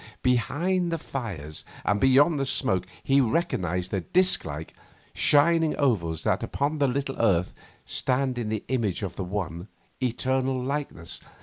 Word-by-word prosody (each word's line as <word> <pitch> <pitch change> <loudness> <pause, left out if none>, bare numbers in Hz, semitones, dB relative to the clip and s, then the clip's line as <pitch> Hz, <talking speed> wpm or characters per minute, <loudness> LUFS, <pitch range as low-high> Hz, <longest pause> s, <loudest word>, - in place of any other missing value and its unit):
Behind 170 +9 +1
the 165 - 0
fires 95 - -5 0.2
and 105 0 +2
beyond 140 +4 +5
the 135 - 0
smoke 95 -9 0 0.2
he 140 +1 +4
recognised 90 - 0
the 95 - 0
disc 185 - +3
like, 80 0 -6 0.4
shining 160 +2 +4
ovals 90 - +1
that - - +1
upon 145 +2 -1
this 140 -2 +3
little 135 +1 -2
earth 95 -6 +2 0.3
stand 130 -1 0
in 110 -3 -2
the 110 -1 -2
image 110 -7 0
of 95 -2 -4
the 95 - -3
one, 90 -2 -4 0.3
eternal 130 +1 0
Likeness. 135 - -4
125 Hz, 145 wpm, -26 LUFS, 95-140 Hz, 0.4 s, beyond